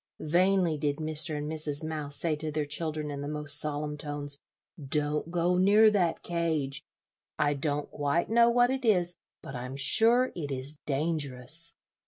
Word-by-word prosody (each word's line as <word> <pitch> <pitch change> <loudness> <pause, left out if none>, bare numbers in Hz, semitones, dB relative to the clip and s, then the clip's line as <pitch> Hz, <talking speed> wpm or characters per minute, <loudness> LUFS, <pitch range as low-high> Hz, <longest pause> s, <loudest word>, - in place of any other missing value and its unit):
Vainly 175 0 +1
did 145 0 -1
Mr. 155 +1 -1
and 145 0 -4
Mrs. 150 -1 -1
Mouse 155 -2 -5
say 160 0 -1
to 155 0 -5
their 150 0 -2
children, 150 0 -3
in 140 -1 -6
the 145 - -5
most 150 -1 +3
solemn 150 0 -1
tones, 145 -1 -5 0.4
"Don't 150 +3 -1
go 175 +1 0
near 210 +3 +5
that 180 -5 0
cage; 155 -5 -2 0.5
I 145 - +1
don't 145 +1 -3
quite 145 +3 -1
know 235 +1 +4
what 245 +1 +3
it 265 0 -3
is, 180 -6 +2 0.3
but 135 - -8
I'm 125 +1 -6
sure 235 - +5
it 145 -5 -5
is 135 +3 -2
dangerous." 150 +1 -1
155 Hz, 165 wpm, -28 LUFS, 145-170 Hz, 0.5 s, near